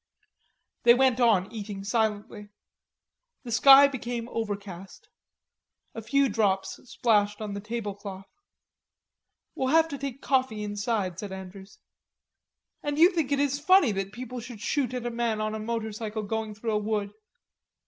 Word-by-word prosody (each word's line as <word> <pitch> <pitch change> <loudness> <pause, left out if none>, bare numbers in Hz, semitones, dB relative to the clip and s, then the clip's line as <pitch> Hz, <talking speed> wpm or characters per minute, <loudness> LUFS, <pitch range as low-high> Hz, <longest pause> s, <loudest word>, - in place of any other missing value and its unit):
They 235 0 +6
went 260 -1 +3
on 215 -6 +3
eating 205 -3 -6
silently. 210 -1 -2 0.9
The 240 - -7
sky 275 +5 +8
became 240 -3 -5
overcast. 200 -5 -6 0.8
A 225 - -6
few 275 +5 +2
drops 200 -4 0
splashed 210 -4 +1
on 210 -2 -5
the 200 - -4
table 215 -1 -4
cloth. 195 -1 -9 1.3
"We'll 260 - -2
have 320 +4 +4
to 280 -3 -6
take 275 -2 -5
coffee 255 -7 0
inside," 205 -3 -2
said 205 -2 -6
Andrews. 190 +1 -10 1.0
"And 290 0 -3
you 340 +4 +7
think 320 -7 -1
it 280 - +2
is 285 0 0
funny 370 - +5
that 195 -1 -3
people 250 +1 -7
shoot 240 +3 -3
at 245 -1 -4
a 240 - -2
man 230 -2 -1
on 215 0 -2
a 220 - -4
motorcycle 220 -1 -4
going 220 0 -4
through 225 +2 -3
a 210 - +1
wood. 210 -1 -2
220 Hz, 150 wpm, -27 LUFS, 205-255 Hz, 1.3 s, sky